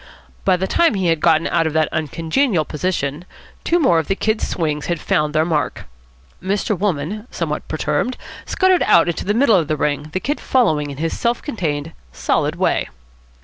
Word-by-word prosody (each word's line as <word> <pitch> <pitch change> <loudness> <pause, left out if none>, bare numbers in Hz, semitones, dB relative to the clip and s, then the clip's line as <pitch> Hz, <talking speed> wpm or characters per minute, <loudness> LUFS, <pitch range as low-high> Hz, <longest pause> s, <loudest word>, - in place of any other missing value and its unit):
By 185 -2 +4
the 190 - -1
time 335 - +2
he 185 -3 +1
had 165 -1 +2
got 160 0 +3
out 165 -1 +1
of 155 - -3
that 155 -1 +2
uncongenial 165 - 0
position, 150 -2 -2 0.4
two 345 - +2
more 175 - +4
of 160 - -3
the 195 - 0
Kid's 220 +2 0
swings 150 -3 -2
had 175 -2 -1
found 150 +1 0
their 155 +1 +3
mark. 150 -5 -1 0.6
Mr. 200 +3 -1
Wolmann, 195 +3 -2
somewhat 155 -3 -4
perturbed, 155 +10 -1 0.3
scuttered 375 -1 +3
out 170 - +5
into 170 - -3
the 205 +2 0
middle 235 -4 +5
of 165 -4 0
the 155 - -1
ring, 150 +1 -1
the 185 - -1
Kid 290 +9 -2
following 155 - +1
in 140 - -7
his 165 +2 -2
self 235 0 -1
contained, 160 - -3 0.2
solid - - 0
way. - - 0
165 Hz, 190 wpm, -19 LUFS, 150-205 Hz, 0.6 s, out